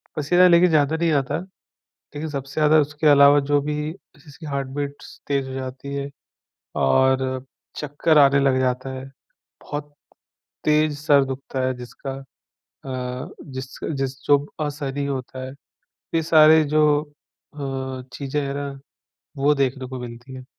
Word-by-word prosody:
पसीना 175 +5 +4
लेकिन 175 +1 +6
ज़्यादा 155 -1 +3
नहीं 165 0 +1
आता। 140 -4 0 0.8
लेकिन 155 +2 -4
सबसे 135 -1 -6
ज़्यादा 155 0 +4
उसके 150 +2 -1
अलावा 145 0 +7
जो 145 +1 +1
भी 150 +1 -2 0.2
जैसे 165 -4 -19
जिसकी 150 +1 -12
हार्ट 140 -2 -3
बीट्स 140 +1 -6
तेज़ 140 -2 0
हो - - -6
जाती 130 +1 -6
है 140 0 -3 0.7
और 130 - +2 0.3
चक्कर 150 +2 +1
आने 140 -1 +6
लग 135 -1 +3
जाता 130 +1 -1
है, 130 0 -7 0.6
बहुत 145 0 -6 0.7
तेज़ 150 -1 +2
सर 145 -2 +4
दुखता 135 0 -5
है 130 - 0
जिसका 125 +2 -8 0.7
अ, 125 -1 -4
जिस 130 -1 -8 0.2
जिस 135 0 -2
जो 145 - +6 0.3
असहनीय 145 -1 -3
होता 130 -1 -5
है। 130 - -8 0.6
ये 165 - +2
सारे 155 0 +6
जो 150 -1 +4 0.5
अ, 135 -2 -4
चीज़ें 140 +1 -3
हैं 140 0 -3
ना 140 0 -3 0.7
वो 140 +2 +3
देखने 135 -1 -1
को 130 0 -6
मिलती 120 +2 -9
हैं। 130 -1 -9
140 Hz, 150 wpm, -23 LUFS, 130-150 Hz, 0.8 s, अलावा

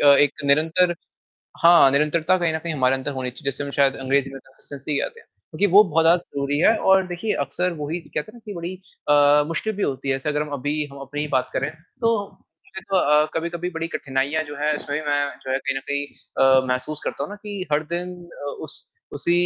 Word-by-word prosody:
क 145 - +4
एक 145 -1 +5
निरंतर 160 +5 +3 0.7
हाँ, 170 -5 +8
निरंतरता 155 +5 +2
कहीं 170 -2 +1
न - - 0
कहीं 165 0 -4
हमारे 130 -1 +2
अंदर 135 +2 -3
होनी 130 -2 -3
चाहिए, 140 +2 -3
जिसे 140 +2 -5
हम 140 - -5
शायद 135 -1 +4
अंग्रेजी 135 +1 +1
में 135 - -8
कंसिस्टेंसी 140 +2 -6
कहते 465 - -4
हैं, - - -23 0.2
क्योंकि 205 - +1
वो 205 - +10
बहुत 165 -2 +1
ज़्यादा 170 +2 +6 0.2
ज़रूरी 140 +1 0
है 220 +8 +5
और 190 -1 +4
देखिए 180 +5 -2
अक्सर 180 +6 -2
वही 155 +4 -2
कहते 165 +4 -6
हैं - - -21
ना 235 - -13
कि 210 - -7
बड़ी 170 +2 -5 0.3
अ, 145 0 +5
मुश्किल 190 +7 -2
भी 205 - -2
होती 135 0 -2
है, 135 - +2
जैसे 135 +3 -3
अगर 150 0 +1
हम 150 - -7
अभी 150 +2 -1
हम 140 - -10
अपनी 140 +2 -5
ही 150 - -2
बात 130 -1 +1
करें, 140 +3 -1 0.3
तो 230 -4 0 0.3
सिर्फ 190 +1 -7
अ, 150 -4 +4
कभी-कभी 170 +2 -3
बड़ी 165 -1 -3
कठिनाइयाँ 140 +2 -1
जो 145 -1 -8
है 150 0 +2
इसमें 145 0 -3
मैं 145 -1 +2
भी 155 - -13
जो 130 - -5
है 135 - +1
कहीं 135 0 -2
न - - -9
कहीं 140 0 -1 0.4
अ, 130 0 +5
महसूस 130 +4 -2
करता 140 - -3
हूँ 150 - -8
ना 205 - -7
कि 205 -3 -5
हर 150 +1 +3
दिन 180 +1 -3 0.3
अ, - - -2 0.2
उस - - -12 0.3
उसी 170 - -1
150 Hz, 235 wpm, -23 LUFS, 140-170 Hz, 0.7 s, वो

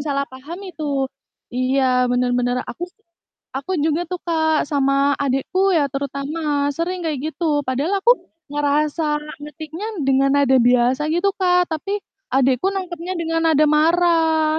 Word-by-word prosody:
salah 280 -1 -1
paham 275 +6 -10
itu. 290 -6 -2 0.4
Iya 255 0 +2
bener 245 0 +1
bener. 245 0 0
Aku 345 - -5
sih 430 +4 -34 0.5
aku 275 +8 -4
juga 315 +3 +1
tuh, 360 - -2
Kak, 315 -2 +1
sama 275 0 +2
adikku 285 +9 +1
ya 310 -5 +3
terutama 285 +2 -2
sering 360 +4 -2
kayak 300 -4 -1
gitu. 305 -4 0
Padahal 295 +10 -1
aku 480 - +7 0.4
ngerasa 295 +2 0 0.4
ngetiknya 315 +5 -7 0.2
dengan 270 0 +3
nada 270 -2 +4
biasa 250 +4 +3
gitu, 345 +5 +2
Kak, 360 -1 +3
tapi 390 +6 -2 0.4
adikku 265 +3 +2
nangkepnya 360 -1 -4
dengan 330 -1 -1
nada 305 -2 +4
marah. 320 0 +3
300 Hz, 140 wpm, -21 LUFS, 275-335 Hz, 0.5 s, aku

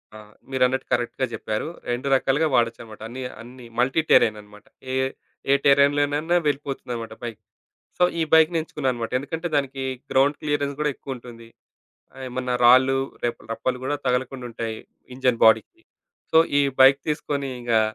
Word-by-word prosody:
ఆ! - - -9 0.3
మీరన్నట్టు 130 0 +1
కరెక్ట్‌గా 120 +2 0
జెప్పారు. 110 +6 -3 0.2
2 125 +3 -3
రకాలుగా 135 +4 +2
వాడొచ్చన్నమాట. 115 -2 -1
అన్ని 125 +3 -7
య - - -4
అన్ని 125 +1 -12
మల్టీ 135 +6 +2
టెర్రెయినన్నమాట. 105 -1 +2 0.3
ఏ - - 0 0.6
ఏ - - +7
టెర్రెయిన్‌లోనైనా 145 +4 +3
వెళ్ళిపోతుందన్నమాట 135 -5 -3
బైకు. 115 -3 -6 0.6
సో, 180 - +5 0.2
ఈ - - +3
బైక్‌నెంచుకున్నానన్నమాట. 155 -7 +1
ఎందుకంటే 160 +5 -4
దానికి 135 -1 -2 0.3
గ్రౌండ్ 140 +2 +3
క్లియరెన్స్ 145 -2 -1
కూడా 150 0 +1
ఎక్కువుంటుంది. 120 -4 -9 0.7
ఆహ్, 135 - -10
ఏమన్నా 125 0 -3
రాళ్ళు, 130 +2 +6 0.3
రె 120 - +3 0.2
రప్పలు 125 +2 -2
కూడా 145 +2 -1
తగలకుండుంటాయి 125 -3 -2 0.4
ఇంజిన్ 125 -2 0
బాడీకి. 225 - +3 0.5
సో, 160 - +7 0.2
ఈ - - +4 0.2
బైకు 135 +1 +7
తీసుకొని, 140 -2 -2
ఇంగా 120 -2 +2
130 Hz, 135 wpm, -23 LUFS, 120-145 Hz, 0.7 s, ఏ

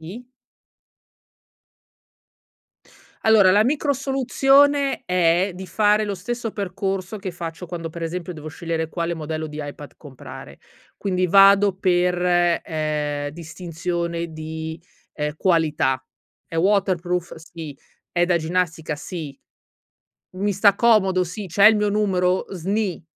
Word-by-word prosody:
I? 195 +10 -9 3.0
Allora, 215 -4 +6
la 205 +3 +4
micro 285 +2 +1
soluzione 275 +1 +2
è 180 +1 +2
di 185 +1 -8
fare 210 0 +2
lo 200 - -3
stesso 230 +5 -4
percorso 195 0 -3
che 190 -2 -5
faccio 170 0 -7
quando, 165 -1 -6
per 170 +1 -9
esempio, 175 +2 -4
devo 155 -2 -9
scegliere 165 0 -3
quale 170 +1 -3
modello 155 -1 -4
di 150 0 -8
iPad 145 0 -9
comprare. 135 -4 -11 0.4
Quindi 185 -2 -1
vado 195 +1 +6
per 180 -1 +2 0.5
ehm, 150 -2 -2
distinzione 170 +1 -4
di, 160 +1 -6 0.3
ehm, 150 0 -3
qualità, 155 -7 +1 0.5
è 165 - -8
waterproof? 180 -2 +1
Sì, 160 -3 -10 0.3
è 175 0 +1
da 175 -1 +2
ginnastica? 165 -2 -2
Sì. 150 -3 -7 1.0
Mi 205 +2 0
sta 200 +1 +4
comodo? 195 -6 +3
Si. 190 +3 -6
C'è 200 +5 +5
il 220 - +8
mio 210 0 +1
numero? 190 -3 +1
Sni. 195 0 -2
180 Hz, 120 wpm, -22 LUFS, 160-200 Hz, 3.0 s, il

